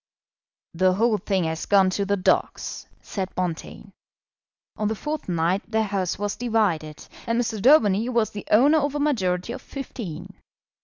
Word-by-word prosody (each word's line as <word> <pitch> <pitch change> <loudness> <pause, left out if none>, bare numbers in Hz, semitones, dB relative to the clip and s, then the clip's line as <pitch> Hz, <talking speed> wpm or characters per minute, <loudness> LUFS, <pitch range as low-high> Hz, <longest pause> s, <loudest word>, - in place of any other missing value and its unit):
"The 185 +2 +3
whole 215 +2 +2
thing 190 -1 0
has 160 0 -3
gone 195 -2 +4
to 200 +1 -1
the 200 +1 0
dogs," 185 - -1 0.2
said 190 -2 -5
Bonteen. 180 +3 -4 0.8
On 210 - -1
the 220 - -1
fourth 300 +1 -5
night 175 +3 +1
the 220 -1 +1
House 195 -4 -2
was 205 +1 -2
divided, 200 -11 -1 0.2
and 230 +1 +1
Mr. 225 -3 -2
Daubeny 230 -4 +4
was 230 -4 +1
the 205 - -8
owner 285 +8 +5
of 285 0 -1
a - - -1
majority 215 -8 0
of 260 - -7
fifteen. 195 - -7
205 Hz, 160 wpm, -24 LUFS, 185-235 Hz, 0.8 s, owner